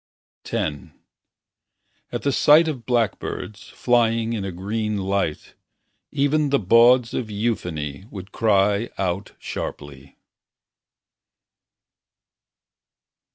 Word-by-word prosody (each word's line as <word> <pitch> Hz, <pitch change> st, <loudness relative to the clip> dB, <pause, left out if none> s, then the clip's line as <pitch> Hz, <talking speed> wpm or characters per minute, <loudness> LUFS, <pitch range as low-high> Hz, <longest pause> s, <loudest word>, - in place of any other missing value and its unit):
X 75 Hz, -3 st, -2 dB, 1.2 s
At -, -, -4 dB
the 140 Hz, -, +1 dB
sight 150 Hz, +4 st, +5 dB
of 130 Hz, -7 st, -5 dB
blackbirds 115 Hz, -3 st, -2 dB
Flying 115 Hz, -2 st, +1 dB
in 105 Hz, -4 st, -3 dB
a 95 Hz, -, -4 dB
green 105 Hz, +4 st, -3 dB
light 95 Hz, -5 st, -2 dB, 0.6 s
Even 145 Hz, +1 st, +1 dB
the 140 Hz, -, +3 dB
bawds 115 Hz, +4 st, +5 dB
of 115 Hz, -4 st, -3 dB
euphony 95 Hz, -8 st, -3 dB
Would 95 Hz, -1 st, -9 dB
cry 105 Hz, 0 st, +2 dB
out 95 Hz, +1 st, -2 dB
sharply. 70 Hz, -1 st, -7 dB
110 Hz, 90 wpm, -22 LUFS, 95-120 Hz, 1.2 s, sight